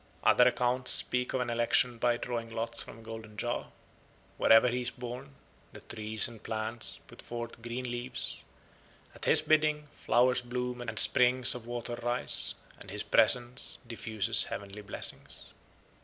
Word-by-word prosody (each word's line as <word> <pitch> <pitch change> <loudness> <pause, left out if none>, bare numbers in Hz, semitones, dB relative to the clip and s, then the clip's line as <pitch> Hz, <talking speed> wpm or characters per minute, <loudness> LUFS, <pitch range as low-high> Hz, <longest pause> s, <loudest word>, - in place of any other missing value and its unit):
Other 125 - +5
accounts 125 +1 0
speak 125 0 +1
of 130 - -1
an 120 -1 -3
election 120 +1 +1
by 120 0 +1
drawing 120 -1 -5
lots 115 +1 -3
from - - -8
a - - -14
golden 110 -1 -10
jar. 120 +2 -4 0.7
Wherever 115 +2 +5
he 125 +1 -1
is 120 - -3
born, 125 +2 -9 0.4
the - - -11
trees 110 0 +1
and 115 -2 -12
plants 110 +1 -2
put - - -14
forth 120 -1 -8
green 120 +2 -5
leaves; 120 +1 -4 0.7
at - - -10
his - - +6
bidding 155 -1 +1
flowers 125 +1 +1
bloom 125 0 -5
and 115 -2 -6
springs 125 +3 +5
of 120 -2 -8
water 120 0 -5
rise; 120 +1 +1 0.2
and - - -12
his 105 +2 -4
presence 120 +3 +3
diffuses 110 -4 +3
heavenly 100 +1 -7
blessings. 100 - -4
120 Hz, 155 wpm, -30 LUFS, 115-125 Hz, 0.7 s, his